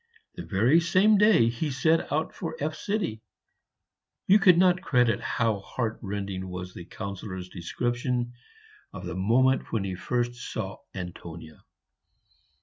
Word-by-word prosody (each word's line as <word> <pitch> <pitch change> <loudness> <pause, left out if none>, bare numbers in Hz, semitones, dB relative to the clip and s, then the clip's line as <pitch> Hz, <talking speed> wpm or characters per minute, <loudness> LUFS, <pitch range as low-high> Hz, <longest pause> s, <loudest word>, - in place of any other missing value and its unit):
The - - -7
very 115 - +3
same 185 +5 +4
day 210 - +5
he 120 +7 -1
set 160 +4 +1
out 155 +2 -1
for - - -5
F. 155 +2 -2
You 185 - -3
could 180 -3 +7
not 180 0 +4
credit 125 -9 +2
how 110 -3 0
heartrending 100 -4 -4
was 90 0 -6
the 85 - -9
Councillor's 95 -2 -6
description 120 +7 -2 0.6
of 95 -2 -7
the 90 - -4
moment 120 +8 +2
when 110 -4 0
he 95 -1 -3
first 120 +6 -1
saw 110 -5 -5 0.2
Antonia. 85 -3 -8
115 Hz, 130 wpm, -27 LUFS, 95-150 Hz, 0.6 s, could